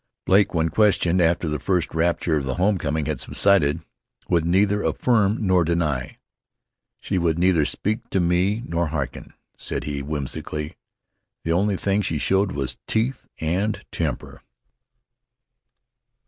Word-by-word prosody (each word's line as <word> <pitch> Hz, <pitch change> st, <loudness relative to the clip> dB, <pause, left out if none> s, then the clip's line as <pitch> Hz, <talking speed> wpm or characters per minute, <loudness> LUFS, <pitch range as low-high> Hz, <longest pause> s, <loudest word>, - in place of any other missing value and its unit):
Blake, 100 Hz, +2 st, +4 dB
when 80 Hz, -1 st, +1 dB
questioned, 95 Hz, -3 st, +3 dB
after 85 Hz, 0 st, +2 dB
the 75 Hz, -1 st, -2 dB
first 90 Hz, -4 st, 0 dB
rapture 85 Hz, 0 st, +1 dB
of 75 Hz, -, 0 dB
the 65 Hz, 0 st, -2 dB
home 95 Hz, +1 st, +1 dB
coming 75 Hz, 0 st, -1 dB
had -, -, -3 dB
subsided, 85 Hz, -6 st, +2 dB, 0.5 s
would 85 Hz, -1 st, +1 dB
neither 100 Hz, +3 st, +2 dB
affirm 110 Hz, -3 st, +2 dB
nor 90 Hz, -2 st, +4 dB
deny. 75 Hz, -6 st, -1 dB, 0.8 s
"She 95 Hz, -, -1 dB
would 85 Hz, -2 st, +1 dB
neither 85 Hz, -3 st, +3 dB
speak 110 Hz, +8 st, -2 dB
to 95 Hz, -, 0 dB
me 90 Hz, +6 st, +1 dB
nor 85 Hz, 0 st, -1 dB
harken," 75 Hz, -4 st, -5 dB, 0.2 s
said -, -, -4 dB
he, 70 Hz, -1 st, -4 dB
whimsically. 75 Hz, +1 st, -4 dB, 0.7 s
"The 80 Hz, -, -1 dB
only 95 Hz, +3 st, +1 dB
thing 100 Hz, +2 st, +1 dB
she 80 Hz, -5 st, -1 dB
showed 95 Hz, +5 st, +1 dB
was 70 Hz, -3 st, -3 dB
teeth 120 Hz, +4 st, -1 dB
and 95 Hz, +7 st, -1 dB
temper." -, -, -4 dB
85 Hz, 140 wpm, -23 LUFS, 80-100 Hz, 0.8 s, Blake